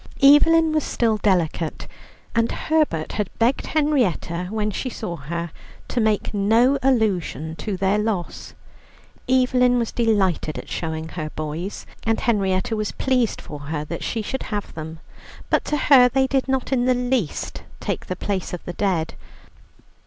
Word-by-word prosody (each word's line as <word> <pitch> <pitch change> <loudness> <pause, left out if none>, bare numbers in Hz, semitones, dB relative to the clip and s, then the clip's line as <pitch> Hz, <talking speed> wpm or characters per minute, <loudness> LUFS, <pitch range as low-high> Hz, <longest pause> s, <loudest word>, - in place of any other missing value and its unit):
Evelyn 320 +3 +6
was 310 -1 +1
still 225 -2 +1
delicate, 175 -5 0 0.5
and 230 0 +2
Herbert 305 - 0
had 210 -3 -2
begged 235 +4 +1
Henrietta 240 - 0
when 215 0 -1
she 255 - -3
saw 200 -7 -5
her 170 +3 -5 0.4
to 245 - 0
make 215 -1 +1
no 225 +7 +3
allusion 195 - 0
to 205 -4 -3
their 195 +2 +2
loss. 210 -5 -3 0.7
Evelyn 250 -1 +4
was 235 -2 -1
delighted 200 -9 +1
at - - -8
showing 160 -1 -4
her 155 -3 -5
boys, 155 +6 -5 0.2
and 225 0 0
Henrietta 195 -1 +1
was 215 -1 -2
pleased 250 -4 +1
for 150 - -8
her 150 -1 -2
that 170 +2 -5
she 225 - -2
should 265 +5 -3
have 205 -2 -4
them, 160 0 -7 0.5
but - - +3
to 300 - 0
her 260 -4 +6
they 265 +2 +2
did 265 0 0
not 265 0 -1
in 245 -2 +2
the 255 0 +3
least 245 - -2 0.2
take - - -3
the 185 - -3
place 190 -1 -3
of 180 - -6
the 175 - -5
dead. 180 -5 0
215 Hz, 160 wpm, -22 LUFS, 175-250 Hz, 0.7 s, Evelyn